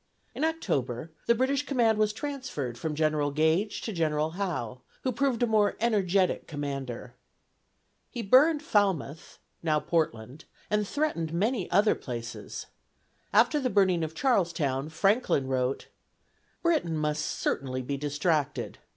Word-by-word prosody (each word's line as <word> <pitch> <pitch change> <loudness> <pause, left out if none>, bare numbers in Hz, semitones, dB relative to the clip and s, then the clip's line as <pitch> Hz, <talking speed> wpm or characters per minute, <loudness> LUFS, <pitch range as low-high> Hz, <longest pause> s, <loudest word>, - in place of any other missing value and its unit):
In - - -3
October, 160 - -1 0.2
the 235 - +5
British 265 +4 +1
command 230 -5 +2
was 215 -1 +3
transferred 220 - -4
from 150 +5 -3
General 155 -1 +1
Gage 160 +8 +1
to 220 - -4
General 155 -2 0
Howe, 160 - -3 0.2
who 260 - +1
proved 250 -1 0
a - - +6
more 215 -3 +2
energetic 200 -5 +1
commander. 135 -5 -5 1.0
He 240 -2 -5
burned 290 +8 +5
Falmouth 190 - 0 0.2
(now 155 -2 +2
Portland), 145 -4 -2 0.3
and 210 -1 +1
threatened 195 - -1
many 205 +3 0
other 200 +4 +4
places. 120 -2 -6 0.7
After 300 - +4
the 260 -2 0
burning 190 -5 +3
of 160 0 -4
Charlestown, 170 - +1
Franklin 195 - +2
wrote: 130 0 -1 0.8
"Britain 300 - +1
must 150 -1 -1
certainly 130 -1 -2
be 140 +3 -2
distracted. 145 +2 -1
170 Hz, 130 wpm, -28 LUFS, 145-220 Hz, 1.0 s, a